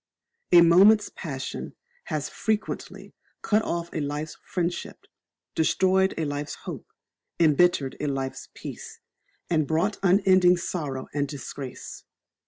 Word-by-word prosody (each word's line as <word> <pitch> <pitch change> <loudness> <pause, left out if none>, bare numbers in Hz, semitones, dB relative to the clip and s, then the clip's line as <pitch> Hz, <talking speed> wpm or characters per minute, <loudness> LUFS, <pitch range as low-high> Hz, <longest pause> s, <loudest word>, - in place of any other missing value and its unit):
A 175 -1 +9
moment's 195 +5 +6
passion 135 -6 -6 0.3
has - - -3
frequently 220 -1 -3 0.3
cut 215 +1 +3
off 170 -4 -3
a - - -2
life's 150 +2 -4
friendship, 175 -1 -4 0.5
destroyed 190 +4 +2
a 160 - -1
life's 145 0 -4
hope, - - -8 0.5
embittered 160 -3 +3
a 150 - -2
life's 135 -1 -4
peace, - - -9 0.5
and 155 -4 +1
brought 175 +6 0
unending 185 -1 +5
sorrow 145 -7 -4
and 145 -1 0
disgrace. 135 -1 -8
170 Hz, 115 wpm, -26 LUFS, 145-185 Hz, 0.5 s, A